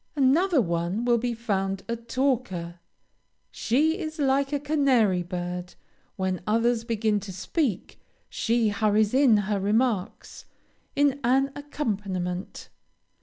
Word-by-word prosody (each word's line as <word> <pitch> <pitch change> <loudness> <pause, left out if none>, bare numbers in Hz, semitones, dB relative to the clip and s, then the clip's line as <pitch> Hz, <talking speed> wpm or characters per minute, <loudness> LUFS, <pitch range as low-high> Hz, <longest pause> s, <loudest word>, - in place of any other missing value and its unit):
Another 295 +4 +3
one 170 +4 -1
will 240 -1 +3
be 240 0 -2
found 195 -4 -2
a 235 - -1
talker. 230 -8 -2 0.7
She 310 - +1
is 315 -3 -5
like 275 -1 +1
a 290 - 0
canary 270 -10 +2
bird; 180 0 -5 0.4
when 190 -2 -2
others 230 +1 +2
begin 220 -2 0
to 200 0 -8
speak, 200 - -3 0.3
she 230 -1 +1
hurries 210 +1 +1
in 260 -5 +5
her 205 0 -1
remarks, 210 0 -1 0.5
in 285 -1 +2
an 270 +3 +2
accompaniment. 200 -11 -4
230 Hz, 120 wpm, -26 LUFS, 195-270 Hz, 0.7 s, in